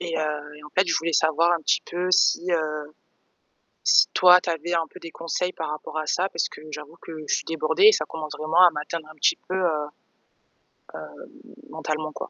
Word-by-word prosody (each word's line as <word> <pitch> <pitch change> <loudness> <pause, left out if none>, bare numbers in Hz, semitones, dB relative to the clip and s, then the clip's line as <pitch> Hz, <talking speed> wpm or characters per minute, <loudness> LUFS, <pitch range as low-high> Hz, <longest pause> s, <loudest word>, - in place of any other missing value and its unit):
Et 170 -2 -4
heu, 150 -1 -4
et 150 - -15
en - - -10
fait 185 - +4
je 170 - 0
voulais 165 0 -1
savoir 160 +3 +3
un 170 - 0
petit - - +1
peu 180 +1 -2
si, 180 0 +3
heu, 155 -2 -2 0.9
si - - +6
toi 180 0 +7
tu 180 - -7
avais 165 +1 -3
un 165 -1 0
peu - - -13
des 165 - -9
conseils 170 +2 -3
par 160 -4 -5
rapport 155 +1 -6
à 155 - -3
ça 185 +5 0
parce - - -1
que - - -13
j'avoue 150 +2 -9
que 165 - -10
je - - +1
suis - - -3
débordée 165 - +2
et 435 - +7
ça - - 0
commence 155 -1 -7
vraiment 155 +3 +3
à 180 - +8
m'atteindre 155 +1 -5
un 155 - -15
petit 335 - +2
peu, 185 - -3
heu 190 - 0 1.9
heu, - - -16 0.2
mentalement 155 0 -4
quoi. - - -8
160 Hz, 220 wpm, -24 LUFS, 155-175 Hz, 1.9 s, à